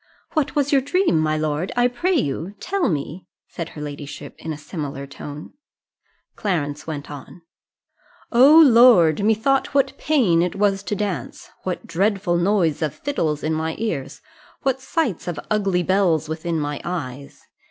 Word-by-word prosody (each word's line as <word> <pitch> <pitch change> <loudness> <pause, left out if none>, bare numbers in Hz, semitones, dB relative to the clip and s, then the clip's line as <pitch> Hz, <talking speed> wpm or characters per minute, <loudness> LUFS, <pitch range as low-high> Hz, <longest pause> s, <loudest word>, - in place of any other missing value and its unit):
"What 310 -2 0
was 285 -1 +1
your 275 -2 +4
dream, 340 - +1
my 155 0 +1
lord? 155 +3 -2
I 245 0 +4
pray 340 +10 0
you, 175 - -2
tell 395 -2 0
me," 155 +2 -4 0.2
said 170 -1 -6
her - - -6
ladyship 145 -1 -7
in 160 - -5
a 155 - -5
similar 145 -3 -6
tone. 145 +2 -9 0.8
Clarence 155 -6 -2
went 150 -2 -6
on 145 +4 -11 0.9
"O 270 +6 +7
Lord, 230 - +6
methought 225 +7 +1
what 275 -1 +2
pain 235 - +3
it 180 +2 -1
was 195 -1 +1
to 205 - -2
dance! 200 -3 -4
What 185 -1 -3
dreadful 195 -1 0
noise 175 -4 +1
of 155 -2 -1
fiddles 160 - -2
in 155 +1 0
my 160 +1 -2
ears! 215 -12 -4 0.4
What 265 -1 0
sights 265 - -2
of 175 -4 -3
ugly 195 -4 +1
belles 185 -5 +2
within 160 +1 -3
my 145 -1 -3
eyes! 140 -6 -6
180 Hz, 155 wpm, -22 LUFS, 155-235 Hz, 0.9 s, O